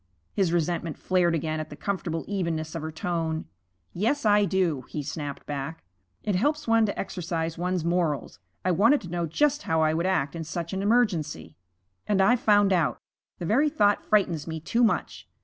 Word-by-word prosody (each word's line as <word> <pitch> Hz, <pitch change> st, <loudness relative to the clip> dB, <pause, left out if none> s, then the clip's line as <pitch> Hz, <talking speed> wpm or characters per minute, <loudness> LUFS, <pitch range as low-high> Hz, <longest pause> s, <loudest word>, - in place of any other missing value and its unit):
His 190 Hz, -4 st, +1 dB
resentment 170 Hz, -1 st, -1 dB
flared 180 Hz, -2 st, +2 dB
again 155 Hz, 0 st, -2 dB
at 155 Hz, 0 st, -5 dB
the 145 Hz, -, -8 dB
comfortable 175 Hz, -3 st, -3 dB
evenness 165 Hz, -5 st, -2 dB
of 165 Hz, -, -4 dB
her 160 Hz, +1 st, -4 dB
tone. 160 Hz, -1 st, -2 dB, 0.5 s
'Yes, 230 Hz, +9 st, 0 dB
I 205 Hz, -1 st, +5 dB
do,' 185 Hz, -8 st, +1 dB
he 150 Hz, -, -4 dB
snapped 145 Hz, -1 st, -5 dB
back. 145 Hz, +2 st, -5 dB, 0.4 s
'It 205 Hz, -, 0 dB
helps 295 Hz, +10 st, 0 dB
one 225 Hz, -1 st, +4 dB
to 200 Hz, -, -4 dB
exercise 165 Hz, -3 st, -3 dB
one's 180 Hz, -1 st, -1 dB
morals. 165 Hz, -, -1 dB, 0.3 s
I 185 Hz, -, +3 dB
wanted 230 Hz, -, +4 dB
to 175 Hz, -, -9 dB
know 170 Hz, -1 st, -1 dB
just 295 Hz, -, +1 dB
how 160 Hz, -, +1 dB
I 155 Hz, 0 st, +3 dB
would 170 Hz, +3 st, 0 dB
act 170 Hz, -7 st, 0 dB
in 165 Hz, -, -4 dB
such 170 Hz, +2 st, -5 dB
an 190 Hz, -, -1 dB
emergency. 165 Hz, -, 0 dB, 0.5 s
And 205 Hz, -2 st, +2 dB
I've 225 Hz, +6 st, +4 dB
found 205 Hz, -3 st, +4 dB
out. 155 Hz, -9 st, +1 dB, 0.4 s
The 175 Hz, -, -5 dB
very 275 Hz, -, +3 dB
thought 205 Hz, -9 st, +2 dB
frightens 180 Hz, -8 st, +1 dB
me 160 Hz, -1 st, -4 dB
too 230 Hz, +10 st, +1 dB
much. 225 Hz, -, 0 dB
175 Hz, 185 wpm, -26 LUFS, 160-205 Hz, 0.5 s, I